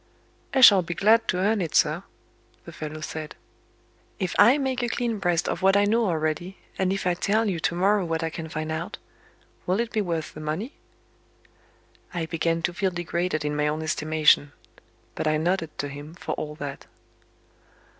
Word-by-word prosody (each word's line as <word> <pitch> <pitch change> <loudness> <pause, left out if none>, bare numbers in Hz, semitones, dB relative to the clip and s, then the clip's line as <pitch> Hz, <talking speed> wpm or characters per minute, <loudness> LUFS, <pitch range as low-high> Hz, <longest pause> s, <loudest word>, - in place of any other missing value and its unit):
"I 265 - +2
shall 200 -6 +9
be 170 0 -5
glad 225 +5 +4
to 180 - 0
earn 205 +3 +1
it, 165 -4 -3
sir," - - +3 0.6
the - - -9
fellow 155 0 -7
said. 155 0 -6 0.8
"If 185 -4 -2
I 245 +6 +7
make 265 -3 -1
a 240 - -1
clean 235 -3 -2
breast 175 -3 +1
of 170 - -2
what 195 +1 +4
I 205 - +4
know 225 +2 +2
already, 165 +2 -2 0.2
and 190 -1 +1
if 195 -1 -2
I 180 - +3
tell 215 +5 +1
you 180 -5 -1
to 165 - -1
morrow 195 +3 +2
what 165 -1 -2
I 160 - -2
can 160 0 -6
find 155 0 -4
out 165 +5 -4 0.7
will 185 +4 +1
it 235 0 -1
be 220 - 0
worth 165 -5 -3
the - - -9
money?" 155 - -4 1.4
I 165 -2 -1
began 165 0 -1
to 175 - 0
feel 190 +2 0
degraded 175 -2 -2
in 150 0 -1
my 150 0 +1
own 155 +1 -2
estimation. 155 -2 +2 0.6
But - - -3
I 155 0 +2
nodded 165 0 -1
to 145 - -2
him, 145 +3 -9
for - - -6
all 150 0 -4
that. 145 -2 -7
175 Hz, 190 wpm, -25 LUFS, 155-200 Hz, 1.4 s, shall